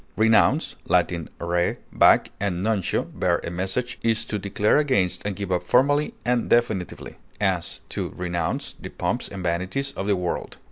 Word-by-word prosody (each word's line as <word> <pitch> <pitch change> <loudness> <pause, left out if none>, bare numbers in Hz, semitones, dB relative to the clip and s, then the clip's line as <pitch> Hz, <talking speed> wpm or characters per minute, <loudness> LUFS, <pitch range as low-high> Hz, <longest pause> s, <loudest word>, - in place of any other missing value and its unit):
Renounce 115 +7 +3
(L. 90 -1 +5 0.4
re, 85 +1 0 0.2
back, - - +5
and 95 -3 -1
nuntio, 110 -5 +1
bear - - +1
a - - -4
message) 95 +8 -2
is 115 -1 +1
to 105 - -3
declare 100 +4 +2
against 130 -12 +1
and 100 -1 -2
give 100 -1 -4
up 90 - +1
formally 145 +4 +2
and 120 -1 +1
definitively; 110 -6 0 0.2
as, 95 -4 -1
to - - -3
renounce 85 -2 -3
the - - -9
pomps - - -2
and 95 -2 -7
vanities 95 +11 -1
of 95 -6 -5
the 100 - +3
world. 90 -1 -3
100 Hz, 160 wpm, -24 LUFS, 90-120 Hz, 0.4 s, L